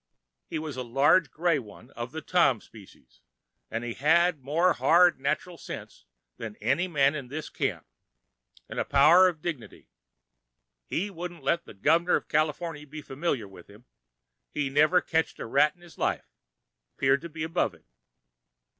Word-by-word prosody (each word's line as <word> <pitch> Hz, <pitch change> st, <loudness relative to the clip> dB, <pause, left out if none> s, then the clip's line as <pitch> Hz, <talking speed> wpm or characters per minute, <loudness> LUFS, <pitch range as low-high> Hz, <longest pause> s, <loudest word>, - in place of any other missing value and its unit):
He -, -, -4 dB
was 155 Hz, -4 st, -5 dB
a -, -, -2 dB
large 135 Hz, +6 st, +3 dB
grey 165 Hz, +2 st, +1 dB
one 115 Hz, +1 st, -13 dB
of 120 Hz, +1 st, -6 dB
the 160 Hz, +1 st, -6 dB
Tom 140 Hz, -10 st, +3 dB
specie, 100 Hz, -, -17 dB, 0.6 s
an' 115 Hz, +1 st, -3 dB
he 120 Hz, -1 st, -4 dB
had 165 Hz, +4 st, +3 dB
more 165 Hz, +7 st, +2 dB
hard, 175 Hz, -2 st, +4 dB
natchral 155 Hz, +5 st, -2 dB
sense -, -, -9 dB, 0.3 s
than 110 Hz, -2 st, -7 dB
any 135 Hz, -, 0 dB
man 140 Hz, -4 st, +3 dB
in 140 Hz, -4 st, -6 dB
this 150 Hz, +4 st, -6 dB
camp—'n' -, -, -7 dB
a -, -, +2 dB
power 155 Hz, +7 st, +6 dB
of 165 Hz, -4 st, -4 dB
dignity—he 60 Hz, -, -8 dB
wouldn't 175 Hz, -3 st, -7 dB
let 170 Hz, +5 st, 0 dB
the -, -, -13 dB
Gov'ner 165 Hz, -, +3 dB
of -, -, -3 dB
Cal[Pg 155 Hz, -1 st, +1 dB
145]iforny 150 Hz, -4 st, -7 dB
be 155 Hz, +1 st, -8 dB
familiar 135 Hz, -6 st, -2 dB
with 95 Hz, -3 st, -15 dB
him. 105 Hz, +4 st, -17 dB, 0.6 s
He 145 Hz, -2 st, -2 dB
never 155 Hz, +6 st, +4 dB
ketched 160 Hz, 0 st, -1 dB
a -, -, -6 dB
rat 145 Hz, +8 st, +3 dB
in 175 Hz, -, -27 dB
his 175 Hz, -1 st, -16 dB
life—'peared 100 Hz, -, -3 dB
to 170 Hz, -, -8 dB
be 155 Hz, 0 st, -6 dB
above 165 Hz, +2 st, -1 dB
it. -, -, -24 dB
150 Hz, 160 wpm, -27 LUFS, 120-170 Hz, 0.6 s, power